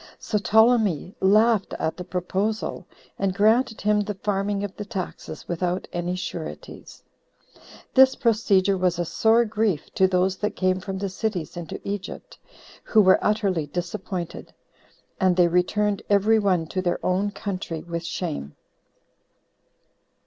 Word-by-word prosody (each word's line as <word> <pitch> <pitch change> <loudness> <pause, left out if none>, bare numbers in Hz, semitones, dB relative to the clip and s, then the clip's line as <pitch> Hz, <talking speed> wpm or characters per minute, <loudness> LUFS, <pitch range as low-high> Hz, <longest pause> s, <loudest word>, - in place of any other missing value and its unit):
So 210 - -2
Ptolemy 215 -4 +3
laughed 215 +1 +3
at 160 - -2
the 180 - -6
proposal, 190 +4 -3 0.3
and 190 -2 0
granted 220 +3 +2
him 210 0 +2
the 205 0 -4
farming 200 0 -1
of 200 -2 -5
the 210 - -5
taxes 200 -3 -6
without 180 +1 -2
any 175 +1 -2
sureties. 170 -3 -7 0.9
This 265 0 +6
procedure 200 -5 +2
was 180 -2 +1
a 175 - -1
sore 225 +7 +3
grief 215 -7 -1
to 190 - +4
those 185 0 +1
that 210 - -2
came 185 0 +1
from 190 0 -5
the 200 +1 -2
cities 190 -4 -3
into 170 -3 -6
Egypt, 205 - -6 0.4
who 220 - +3
were 190 -2 +5
utterly 195 -7 0
disappointed; 175 +2 -5 0.6
and 185 -2 +3
they 175 -1 +5
returned 200 +4 +1
every 210 +2 +4
one 185 -5 +1
to 185 - -2
their 175 -1 0
own 190 +3 +1
country 185 -6 -5
with 170 -1 -5
shame. 165 - -4
190 Hz, 140 wpm, -24 LUFS, 180-210 Hz, 0.9 s, This